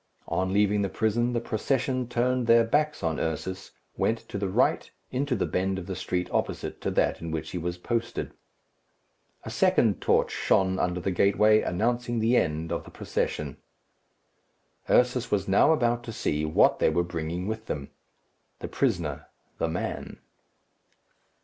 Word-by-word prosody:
On 95 0 -1
leaving 105 +1 +2
the 100 - 0
prison, 120 +4 0
the 120 - +1
procession 130 +2 -1
turned 125 0 0
their 115 0 +6
backs 150 +6 0
on 80 -1 0
Ursus, 95 +4 -3 0.3
went 115 - +1
to 100 - -4
the 100 -1 -1
right, - - +1 0.2
into 130 0 0
the - - 0
bend 95 +1 -1
of 95 - -5
the 95 - -4
street 90 0 -2
opposite - - -2
to - - -1
that - - +1
in 85 - -5
which 80 -1 -4
he 90 - -3
was 85 +1 -3
posted. 115 +5 -3 1.1
A - - -6
second - - +2
torch - - +2
shone 95 -1 +1
under 90 0 0
the 95 +2 -1
gateway, 105 +4 +4
announcing 120 +5 -1
the 115 +2 +2
end 80 -4 0
of 85 - -2
the - - -12
procession. 75 -3 -3 1.3
Ursus 125 0 +3
was 100 -2 0
now 100 +10 +5
about 120 -5 +1
to 115 - -5
see 75 -7 -1
what 75 - +3
they - - +4
were 85 - +1
bringing 85 +1 -4
with 110 +1 -4
them. 70 -2 -4 0.7
The - - -6
prisoner - - -1 0.3
the - - +1
man. 85 +3 -4
100 Hz, 160 wpm, -27 LUFS, 90-120 Hz, 1.3 s, their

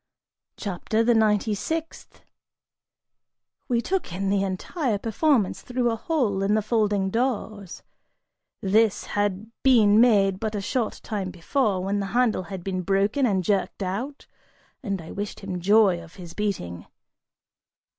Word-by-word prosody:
CHAPTER 210 +3 -1
THE 240 +1 +4
NINETY 215 -1 +2
SIXTH. 320 +10 -5 1.4
We 235 -2 +1
took 375 - -2
in 195 +2 -1
the 200 -1 +2
entire 210 - -2
performance 225 - +1
through 245 -1 0
a - - -1
hole 225 - 0
in 200 +2 +2
the 215 - +1
folding 205 -3 +1
doors: 220 -5 -2 0.8
this 210 +2 +2
had 205 +1 -1
been 225 -5 +5
made 200 -5 +4
but 220 -1 -3
a - - -1
short 230 +3 -2
time 200 -4 -3
before, 185 +2 0
when 200 +2 -1
the 195 - -2
handle 245 -6 +2
had 190 -3 -6
been 185 -1 -2
broken 200 +8 +1
and 190 -4 +1
jerked 200 +1 0
out, 235 +10 -4 0.6
and 200 -7 -3
I 160 - -10
wished 205 0 -5
him 190 -2 -4
joy 200 -2 +4
of 165 0 -14
his 175 -3 -10
beating. 170 - -3
205 Hz, 145 wpm, -25 LUFS, 195-230 Hz, 1.4 s, been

